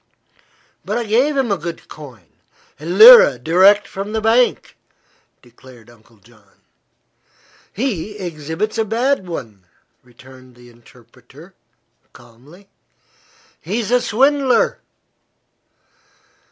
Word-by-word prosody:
"But - - -4
I 240 - -3
gave 250 +7 0
him 260 -5 -1
a 195 - -2
good 170 +1 -9
coin 130 - -14 0.5
a 155 - -10
lira 480 - +7
direct 190 +5 +2
from 200 +2 -8
the 220 - -2
bank," 230 +3 0 0.7
declared 120 -1 -19
Uncle 115 0 -24
John. 105 -1 -26 1.1
"He 210 -4 -5
exhibits 170 +4 -6
a - - +1
bad 230 0 -2
one," 110 - -9 0.4
returned 130 +1 -19
the 120 0 -18
interpreter, 120 - -20 0.6
calmly. 130 - -20 0.9
"He's 215 +6 -5
a 250 0 +2
swindler!" 270 +3 0
170 Hz, 100 wpm, -17 LUFS, -, 1.1 s, lira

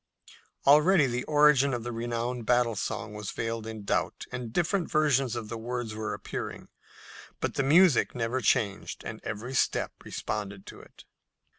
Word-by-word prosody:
Already 150 +3 +6
the 125 -1 -2
origin 145 -3 +4
of 120 - -5
the 120 - -4
renowned 120 +1 -3
battle 120 0 +2
song 105 +3 -4
was 105 -1 -6
veiled 115 -1 -3
in 110 -2 -7
doubt, - - -1
and 125 -2 -5
different 175 - 0
versions 135 -5 +2
of 115 -2 -5
the 115 +1 -5
words 120 -1 -4
were 110 0 -3
appearing; - - -6 0.7
but - - -2
the - - 0
music 160 +2 +4
never 120 +2 -1
changed 100 -2 0
and - - -7
every 115 +5 -5
step 135 - +1
responded 100 -2 -5
to - - -11
it. - - -16
120 Hz, 160 wpm, -28 LUFS, 110-135 Hz, 0.7 s, Already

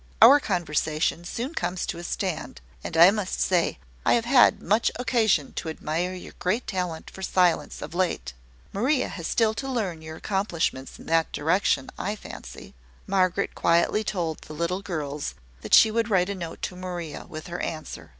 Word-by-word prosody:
Our 265 +6 +9
conversation 165 - -1
soon 245 - -4
comes 180 - -2
to - - -4
a - - -7
stand: 175 - -3 0.2
and 160 - -4
I 170 +3 +9
must 205 -3 -3
say 175 -3 +1 0.3
I - - +4
have 230 -1 +2
had 245 0 +5
much 215 +3 +2
occasion 225 - +1
to 160 - -3
admire 160 +3 -2
your 180 - -10
great 215 +7 0
talent 180 -4 -4
for 190 - -11
silence 180 -2 +1
of - - -8
late. 170 - -1 0.4
Maria 255 +6 +1
has 170 -4 -5
still 220 -2 +2
to 270 +5 -4
learn 200 -10 -2
your 160 0 -8
accomplishments 170 -9 -2
in - - -13
that 165 0 +2
direction, 160 -3 +1
I 205 +3 -2
fancy." - - -10 0.3
Margaret 185 -2 +1
quietly 170 +5 +2
told 175 -7 -2
the 155 - -10
little 170 +4 -1
girls 150 -6 -4 0.3
that - - +4
she 220 - +7
would 230 0 0
write 185 -2 +3
a - - -1
note 170 -4 -7
to 180 - -3
Maria, 175 -4 -6
with 155 0 -7
her 175 0 -5
answer. 115 - -5
180 Hz, 180 wpm, -26 LUFS, 160-210 Hz, 0.4 s, Our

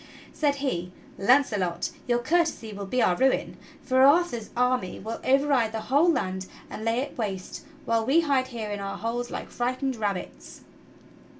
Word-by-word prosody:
Said 290 -2 +1
he: 180 -11 -2 0.3
"Launcelot, 205 -6 +2 0.2
your 240 -1 +3
courtesy 305 -5 0
will 200 -1 -6
be 250 +5 +1
our 180 - +3
ruin, 265 +6 +1 0.3
for 260 -1 +2
Arthur's 280 -5 +4
army 250 -6 +1
will 220 +3 -6
override 270 -4 +2
the 220 - -3
whole 325 +5 +5
land 190 - -2 0.2
and 215 - -6
lay 225 +1 +1
it 285 - -6
waste 195 -4 -4 0.2
while 230 -1 +1
we 275 +8 +4
hide 275 -5 +1
here 225 -4 -5
in 205 - -3
our 195 0 -4
holes 240 +2 -3
like - - -6
frightened 255 +2 -1
rabbits." 205 -4 -5
240 Hz, 165 wpm, -26 LUFS, 210-270 Hz, 0.3 s, whole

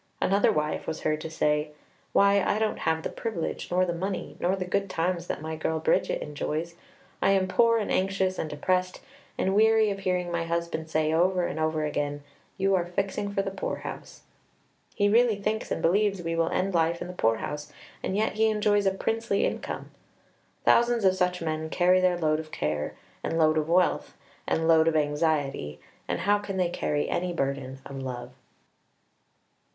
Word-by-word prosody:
Another 200 +2 +3
wife 150 0 -2
was 160 - -4
heard 155 0 0
to 160 - -5
say, 150 -1 0 0.4
"Why, 200 0 +4
I 200 - +1
don't 220 0 0
have 160 0 0
the - - -2
privilege, 220 -8 -4
nor 180 +1 +2
the 175 - -2
money, 190 +3 -4
nor 180 +2 +1
the 185 -1 -3
good 195 +2 -1
times 175 0 -1
that - - -4
my 160 0 -4
girl 160 0 -1
Bridget 160 - +1
enjoys. 155 +3 -3 0.5
I 195 - +4
am 190 -1 +2
poor 230 +4 +4
and 215 - -2
anxious 190 0 0
and 155 - -2
depressed, 185 +5 -1 0.4
and 190 - +1
weary 220 0 +4
of 195 - -4
hearing 180 -2 -1
my 170 -1 -1
husband 170 -1 -3
say, 155 0 +1
over 180 +2 +2
and 160 - -3
over 155 -1 0
again, 145 -1 -2 0.3
'You 195 0 +2
are 175 -2 +1
fixing 195 +2 -2
for 195 -1 0
the 195 - -3
poor 195 - -3
house.' - - -8 0.7
He 205 - +3
really 230 +1 +4
thinks 215 +2 -2
and - - -2
believes 195 +1 +2
we 165 0 -2
will 165 0 +1
end 195 +1 -1
life 170 0 +2
in - - -5
the 180 - -7
poor 115 -10 +2
house; 150 +6 -5 0.3
and 190 - -2
yet 215 +1 +1
he 220 0 +4
enjoys 210 -2 +2
a - - +4
princely 225 0 0
income." - - -4 0.7
Thousands 235 -2 +4
of 190 - +6
such 180 -1 0
men 160 0 -2
carry 180 +2 +3
their 180 -1 +3
load 155 -2 +1
of 155 0 -7
care, 75 0 -2 0.3
and 165 - -1
load 155 -1 +4
of 155 0 0
wealth, 180 +1 +1 0.3
and 160 0 +1
load 160 -1 +5
of 165 - +2
anxiety, 145 - 0 0.3
and - - -2
how 205 +2 +3
can 195 -2 -5
they 180 -2 +1
carry 150 -3 -1
any 180 0 -1
burden 135 -4 -2
of 135 -1 -7
love? 125 -2 -6
175 Hz, 190 wpm, -27 LUFS, 155-195 Hz, 0.7 s, of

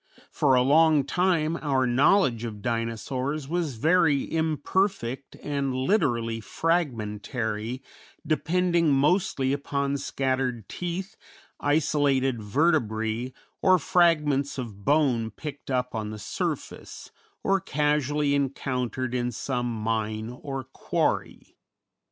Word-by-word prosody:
Knight._] - - -24
For 135 -3 +3
a 125 - +4
long 155 +1 +5
time 170 0 +1
our 135 -4 +1
knowledge 125 - +3
of 105 -3 -6
Dinosaurs 125 +5 -2
was 165 -4 -2
very 155 +2 +3
imperfect 160 - -1
and 140 -3 -1
literally 130 - +1
fragmentary, 115 - -2 0.4
depending 170 +1 +2
mostly 140 -2 +2
upon 140 0 -1
scattered 130 -5 -2
teeth, 180 +4 -5 0.4
isolated 145 -4 +1
vertebræ, 110 -2 0 0.3
or 185 -1 +5
fragments 150 -6 +2
of 110 -6 -6
bone 135 -5 +2
picked 145 +6 -8
up 125 -1 -1
on 110 -2 -3
the 110 - -6
surface 105 - -5 0.3
or 195 0 +2
casually 150 -1 +1
encountered 130 -3 -2
in 125 -1 -1
some 120 0 -2
mine 110 0 -2
or 135 +2 -6
quarry. 130 - -2
135 Hz, 105 wpm, -26 LUFS, 120-155 Hz, 0.4 s, long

